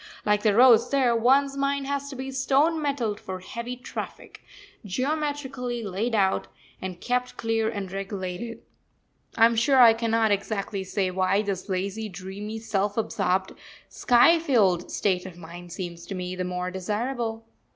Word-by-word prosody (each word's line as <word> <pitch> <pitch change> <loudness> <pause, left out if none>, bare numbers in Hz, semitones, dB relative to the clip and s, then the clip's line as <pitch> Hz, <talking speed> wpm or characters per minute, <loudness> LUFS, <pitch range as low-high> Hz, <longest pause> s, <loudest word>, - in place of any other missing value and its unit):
Like 210 0 +2
the 210 -2 +3
roads 240 -1 +6
there, 260 -4 +3
one's 270 +4 +3
mind 275 0 0
has 280 0 -3
to 275 - -7
be 265 +1 -5
stone 275 +5 +2
metalled 245 -8 -1
for 185 -1 -6
heavy 235 +5 -6
traffic 250 - -8 0.4
geometrically 265 +1 -2
laid 215 +4 -2
out, 195 -2 +1 0.3
and 185 -2 -5
kept 250 +2 -2
clear 225 -1 0
and 200 -4 -5
regulated. 195 +3 -5 0.7
I 225 - +7
am 230 0 +3
sure 260 +4 +4
I 235 -2 +9
cannot 225 -1 +1
exactly 200 -1 -2
say 190 0 -1
why 190 +2 +1
this 200 -1 -4
lazy, 200 +4 -2
dreamy, 200 +3 -7
self 205 -2 -1
absorbed, 190 -3 0 0.4
sky 275 +7 +5
filled 205 - +2
state 185 -2 0
of 175 -2 -11
mind 175 +1 -10
seems 170 -1 -7
to 195 - -5
me 180 0 -4
the 185 0 -3
more 180 0 -3
desirable. 225 +4 -3
220 Hz, 155 wpm, -26 LUFS, 190-250 Hz, 0.7 s, I